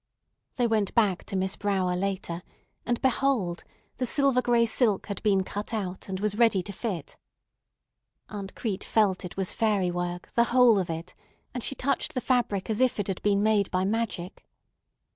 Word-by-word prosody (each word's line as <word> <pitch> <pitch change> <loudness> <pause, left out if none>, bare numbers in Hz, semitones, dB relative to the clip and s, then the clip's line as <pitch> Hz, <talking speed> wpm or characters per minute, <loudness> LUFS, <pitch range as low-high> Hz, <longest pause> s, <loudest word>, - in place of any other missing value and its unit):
They 245 - +1
went 215 -4 0
back 205 -6 +2
to - - -5
Miss 190 0 0
Brower 190 -3 0
later; 185 -2 -2 0.5
and 240 -1 +1
behold! 255 -9 +1 0.3
the 255 - -1
silver 275 -1 +3
gray 235 -1 +3
silk 220 -3 +2
had 200 -3 -5
been 195 -3 +2
cut 205 +4 -4
out, 190 -2 -4
and 190 -1 -3
was 210 +1 -1
ready 225 -6 +4
to 200 - -6
fit. 185 - -5 1.1
Aunt 200 -2 -7
Crete 205 -4 -3
felt 205 -4 +2
it 180 - -8
was 190 -1 0
fairy 205 -5 +1
work, 175 0 -4
the 235 - +4
whole 240 -4 +5
of 180 - -2
it, 165 +2 -5 0.4
and 250 -2 -4
she 275 - -2
touched 275 +1 -1
the - - +1
fabric 240 -7 0
as 220 +1 -1
if 255 -4 +2
it 205 - 0
had 190 - -3
been 205 -1 +2
made 210 -2 +2
by 185 +1 0
magic. 205 -3 -3
205 Hz, 180 wpm, -27 LUFS, 185-235 Hz, 1.1 s, whole